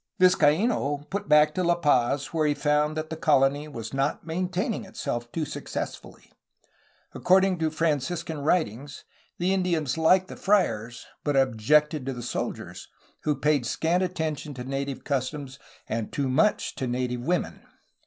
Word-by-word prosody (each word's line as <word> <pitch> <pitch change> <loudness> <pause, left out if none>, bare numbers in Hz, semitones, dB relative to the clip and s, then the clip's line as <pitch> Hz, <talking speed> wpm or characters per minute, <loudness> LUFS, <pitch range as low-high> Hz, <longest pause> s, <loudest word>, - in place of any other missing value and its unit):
Vizcaino 160 - +3
put 200 +1 -3
back 150 0 +6
to 185 - -1
La 175 0 +3
Paz, 140 -2 +1
where 155 -2 +2
he 145 - +1
found 150 +1 +1
that 155 0 -4
the - - -2
colony 145 -1 +2
was 115 -6 -7
not 135 +2 -1
maintaining 185 +7 -2
itself 120 -11 -5
too 160 -2 -2
successfully. - - -7 0.8
Accord 190 +1 +4
ing 185 -3 -1
to 160 -1 +1
Franciscan 160 +1 -1
writings 145 - -1 0.3
the 180 +2 +1
Indians 165 -7 0
liked 185 +3 +4
the - - -9
friars, 120 - 0 0.2
but 145 -1 0
objected 135 +4 +2
to 135 - -1
the 120 -1 -7
soldiers, 120 - -5 0.4
who 150 -1 +2
paid 145 -1 +1
scant 170 +8 +1
attention 160 -5 -3
to 125 - -6
native 135 +1 -4
customs 140 0 -3 0.3
and 110 -1 -3
too 140 -2 -1
much 155 +12 +2
to 130 - -2
native 125 0 -2
women! 175 +7 -1
150 Hz, 155 wpm, -26 LUFS, 135-170 Hz, 0.8 s, back